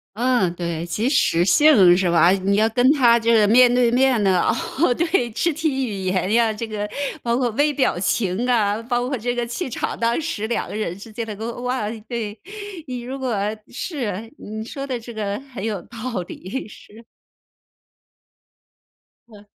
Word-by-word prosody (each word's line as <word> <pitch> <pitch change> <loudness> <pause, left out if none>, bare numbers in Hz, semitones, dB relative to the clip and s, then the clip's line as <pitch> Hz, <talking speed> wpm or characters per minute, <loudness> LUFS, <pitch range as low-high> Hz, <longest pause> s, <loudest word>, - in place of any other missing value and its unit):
嗯， 235 -7 +1
对。 170 -1 -4
即 215 +9 -1
时 175 - +3
性， 200 - +6
是 185 -2 +1
吧？ 170 0 +5
你 195 +1 +1
要 220 +1 +3
跟 245 +3 +2
他 240 -5 +5
这 230 +1 +2
个 215 -2 +5
面 245 +3 +6
对 245 -1 +3
面 250 -3 +3
的， 185 -2 +3 0.4
哦， 310 -7 +4
对， 335 -3 +1
肢 335 +9 0
体 285 -4 -1
语 205 - -4
言 185 +1 0
呀， 230 -1 +3
这 225 +2 -5
个 210 -1 -4 0.4
包 235 0 +1
括 250 -1 +1
微 290 +5 +1
表 265 -9 +1
情 195 +3 0
啊， 215 -3 +2
包 245 +1 -1
括 270 - -1
这 245 +2 -2
个 240 -1 -2
气 260 +7 -4
场， 245 - -4
当 235 +3 +1
时 300 -10 -3
两 235 - -2
个 - - -6
人 210 -5 -3
之 220 +3 -11
间 230 +1 -4
的 215 -2 -6 0.3
哇， 250 -4 -2 0.2
对。 220 -3 -4 0.5
你 250 -2 -5
如 260 +3 -6
果 255 -4 -2 0.3
是， 230 - -5
你 220 +1 -7
说 275 +4 -6
的 255 -3 -3
这 235 +1 -10
个 205 -1 -3
很 210 -6 -7
有 210 -5 -2
道 230 -2 -5
理， 200 +8 -6
是。 215 +2 -15 2.3
嗯。 210 -2 -16
230 Hz, 195 characters per minute, -21 LUFS, 205-250 Hz, 2.3 s, 性